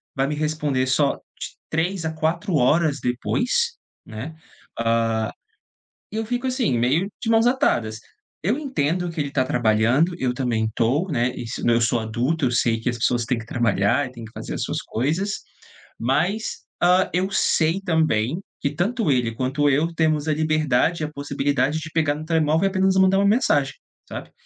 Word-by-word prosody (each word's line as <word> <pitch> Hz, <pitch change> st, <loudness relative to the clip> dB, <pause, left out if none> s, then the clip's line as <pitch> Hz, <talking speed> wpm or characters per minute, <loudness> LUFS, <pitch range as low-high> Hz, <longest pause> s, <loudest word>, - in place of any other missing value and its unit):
vai 135 Hz, 0 st, +1 dB
me 150 Hz, -, -2 dB
responder 150 Hz, -4 st, -1 dB
só 140 Hz, +2 st, +2 dB
de -, -, -10 dB, 0.2 s
3 165 Hz, +2 st, -1 dB
a 160 Hz, -, -2 dB
4 165 Hz, +4 st, -1 dB
horas 150 Hz, +2 st, +3 dB
depois, 250 Hz, -, 0 dB, 0.3 s
né, 115 Hz, +9 st, -7 dB, 0.5 s
ah, 115 Hz, -1 st, +1 dB, 0.8 s
e -, -, -7 dB
eu 225 Hz, -, -1 dB
fico 245 Hz, +3 st, -2 dB
assim, 250 Hz, -, 0 dB
meio 140 Hz, +11 st, +2 dB
de 225 Hz, -, -2 dB
mãos 225 Hz, 0 st, +4 dB
atadas. 115 Hz, -, +1 dB, 0.4 s
Eu 210 Hz, -, +1 dB
entendo 180 Hz, -, -1 dB
que 165 Hz, -, -7 dB
ele 140 Hz, -, -3 dB
tá 135 Hz, -2 st, +2 dB
trabalhando, 120 Hz, +8 st, +2 dB
eu 130 Hz, -5 st, 0 dB
também 120 Hz, -4 st, 0 dB
tô, 135 Hz, +11 st, +1 dB
né, 125 Hz, -2 st, +1 dB
isso 115 Hz, -2 st, -5 dB
eu 115 Hz, 0 st, +4 dB
sou 115 Hz, +1 st, +2 dB
adulto, 125 Hz, +8 st, -1 dB
eu 125 Hz, -, +1 dB
sei 115 Hz, -2 st, +1 dB
que 115 Hz, -, -1 dB
as 120 Hz, -, -3 dB
pessoas 120 Hz, 0 st, +1 dB
têm 120 Hz, +1 st, 0 dB
que 115 Hz, -, -7 dB
trabalhar 120 Hz, +2 st, +1 dB
e -, -, -11 dB
têm 115 Hz, -3 st, -9 dB
que 110 Hz, -, -12 dB
fazer -, -, -6 dB
as -, -, -2 dB
suas -, -, -2 dB
coisas, 160 Hz, -, -2 dB, 0.6 s
mas, 165 Hz, -, 0 dB, 0.2 s
hã, 180 Hz, +1 st, +4 dB
eu 185 Hz, +2 st, +1 dB
sei 165 Hz, -1 st, +2 dB
também 160 Hz, -, +1 dB, 0.2 s
que, 140 Hz, -, 0 dB
tanto 200 Hz, -, 0 dB
ele, 120 Hz, -3 st, +1 dB
quanto 135 Hz, +4 st, +1 dB
eu, 145 Hz, +4 st, +2 dB
temos 155 Hz, -2 st, +1 dB
a 155 Hz, -, +2 dB
liberdade 155 Hz, 0 st, +1 dB
e -, -, +1 dB
a 150 Hz, -, -7 dB
possibilidade 140 Hz, +1 st, 0 dB
de 160 Hz, 0 st, -7 dB
pegar 155 Hz, -3 st, +1 dB
no 155 Hz, -, -6 dB
telemóvel 160 Hz, +1 st, +2 dB
e -, -, +3 dB
apenas 190 Hz, 0 st, +2 dB
mandar 190 Hz, 0 st, +4 dB
uma 200 Hz, -, +3 dB
mensagem, 145 Hz, -, +2 dB, 0.3 s
sabe. -, -, -8 dB
150 Hz, 185 wpm, -23 LUFS, 125-175 Hz, 0.8 s, mãos